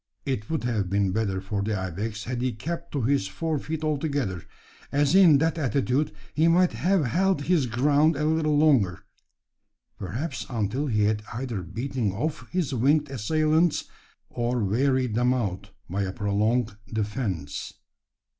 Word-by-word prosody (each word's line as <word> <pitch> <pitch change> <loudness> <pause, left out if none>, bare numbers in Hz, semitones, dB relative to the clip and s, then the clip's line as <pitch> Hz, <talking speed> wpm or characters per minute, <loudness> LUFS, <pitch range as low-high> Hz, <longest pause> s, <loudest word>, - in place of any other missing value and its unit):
It 130 -7 -3
would 160 -4 -1
have 110 -6 -1
been 100 -1 +1
better 100 -2 -1
for 100 +1 -3
the 105 +1 -1
ibex 100 +4 -4
had 120 +1 -3
he 125 -1 0
kept 170 +9 -5
to 140 -4 -1
his 135 -4 +1
fore 155 +10 -2
feet 155 +2 -4
altogether; 145 - -1 0.5
as 145 +1 +2
in 180 -6 +7
that 160 +2 0
attitude 140 -1 +1 0.2
he 160 +2 +3
might 175 +2 +4
have 185 -4 +1
held 180 +3 +1
his 160 -5 +2
ground 145 +6 +3
a 150 +2 -1
little 155 -1 +2
longer 130 - +3 1.0
perhaps 120 - -4
until 120 +4 -1
he 105 -5 +1
had 105 0 +1
either 115 -3 -4
beaten 115 +4 -2
off 150 +9 -3
his 175 -6 -1
winged 145 +4 +2
assailants, 155 +6 +2 0.5
or 120 -1 -1
wearied 130 +3 +1
them 125 +3 +2
out 100 -7 -3 0.2
by 95 +4 -2
a 95 -1 -1
prolonged 105 +3 0 0.2
defence. 105 - -3
125 Hz, 155 wpm, -26 LUFS, 105-150 Hz, 1.0 s, in